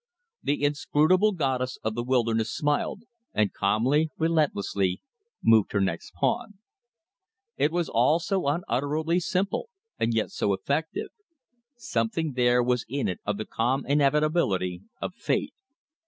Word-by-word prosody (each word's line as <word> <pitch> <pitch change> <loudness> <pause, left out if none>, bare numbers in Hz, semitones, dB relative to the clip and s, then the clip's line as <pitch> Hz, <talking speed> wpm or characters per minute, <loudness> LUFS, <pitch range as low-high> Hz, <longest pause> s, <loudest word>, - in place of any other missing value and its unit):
The 145 0 -1
inscrutable 155 +7 +3
goddess 130 -6 -1
of 110 - -1
the 120 - -2
wilderness 115 -3 +1
smiled, 150 - -1 0.3
and 105 -2 +2
calmly, 125 +10 +2
relentlessly, 100 - +1 0.4
moved 110 -3 +4
her 100 - +2
next 90 -2 -2
pawn. 210 - -1 1.0
It 145 +3 +2
was 170 -1 0
all 130 +8 +3
so 190 -2 -1
unutterably 155 +3 0
simple, 195 - -1 0.3
and 115 - +1
yet 110 -1 0
so 100 - 0
effective. 155 - -2 0.7
Something 145 - -1
there 125 -1 +3
was 125 -1 +1
in 140 +2 -1
it 90 - -3
of 105 0 0
the 110 - -4
calm 125 +4 -1
inevitability 140 - +1 0.2
of - - -4
fate. - - -1
135 Hz, 130 wpm, -26 LUFS, 115-160 Hz, 1.0 s, moved